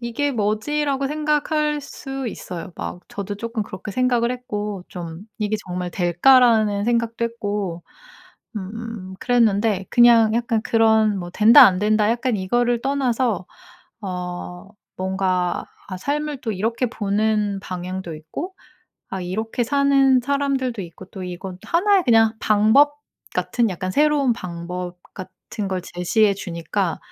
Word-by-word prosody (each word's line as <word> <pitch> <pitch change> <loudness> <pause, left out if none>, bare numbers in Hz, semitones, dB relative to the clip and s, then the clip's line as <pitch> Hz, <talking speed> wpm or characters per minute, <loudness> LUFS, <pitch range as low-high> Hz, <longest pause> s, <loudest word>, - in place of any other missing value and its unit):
'이게 240 +5 -1
뭐지?'라고 270 +6 0
생각할 300 0 0
수 270 -1 -6
있어요. 180 -3 -7
막 175 - -5
저도 200 0 -5
쪼끔 230 0 -3
그렇게 200 +1 -8
생각을 245 -1 +1
했고 210 -6 -4
좀 170 -2 -7 0.2
'이게 215 0 0
정말 180 0 -4
될까?'라는 210 +3 +4
생각도 235 0 0
했고 205 -6 -3 0.7
음 205 -1 -6
그랬는데 215 -5 +2
그냥 230 -2 +6
약간 235 -2 0
그런 220 -2 +3
뭐 175 -1 -6
된다 230 +8 +8
안된다 210 +3 +2
약간 240 -1 0
이거를 240 +5 0
떠나서 250 -8 0 0.6
어 180 0 -6 0.3
뭔가 185 -1 -1 0.2
아 185 - -5
삶을 295 +3 -3
또 225 - -2
이렇게 225 +6 -1
보는 210 -1 0
방향도 185 -2 -5
있고 285 - -7 0.6
아 190 - -4
이렇게 220 +6 -2
사는 275 0 +4
사람들도 265 -4 -1
있고 175 +2 -11
또 190 -1 -9
이건 180 +1 -7
또 - - -13
1 390 +4 +4
의 - - +1
그냥 225 -2 +4
방법 220 +8 +4 0.4
같은 235 -3 0
약간 185 +1 -4
새로운 290 -3 +3
방법 180 -1 -6 0.2
같은 195 +1 -7
걸 185 -1 -2
제시해 195 +4 +1
주니까 175 0 -3
215 Hz, 270 characters per minute, -22 LUFS, 185-250 Hz, 0.7 s, 된다